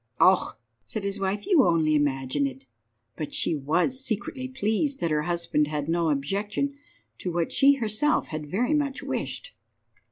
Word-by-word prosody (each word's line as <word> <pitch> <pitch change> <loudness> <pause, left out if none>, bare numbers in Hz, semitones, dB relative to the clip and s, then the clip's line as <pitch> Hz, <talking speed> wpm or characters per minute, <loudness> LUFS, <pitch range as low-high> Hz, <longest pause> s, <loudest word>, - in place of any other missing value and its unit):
"Oh," 185 0 +4 0.3
said 215 - -5
his 200 0 -2
wife, 195 +1 -1
"you 340 -8 +5
only 165 -4 +3
imagine 140 -1 +1
it." 135 0 -9 0.5
But 155 - -4
she - - +2
was 170 - 0
secretly 255 +2 -3
pleased 260 +3 -1
that 170 - -1
her 150 0 +2
husband 170 -2 0
had 150 -1 -3
no 165 0 +1
objection 200 - -1 0.5
to 180 - -3
what 170 -1 -1
she 280 +1 +6
had 275 - -5
herself 225 +8 +1
very 175 - -1
much 280 -2 0
wished. - - -4
185 Hz, 160 wpm, -26 LUFS, 150-255 Hz, 0.5 s, she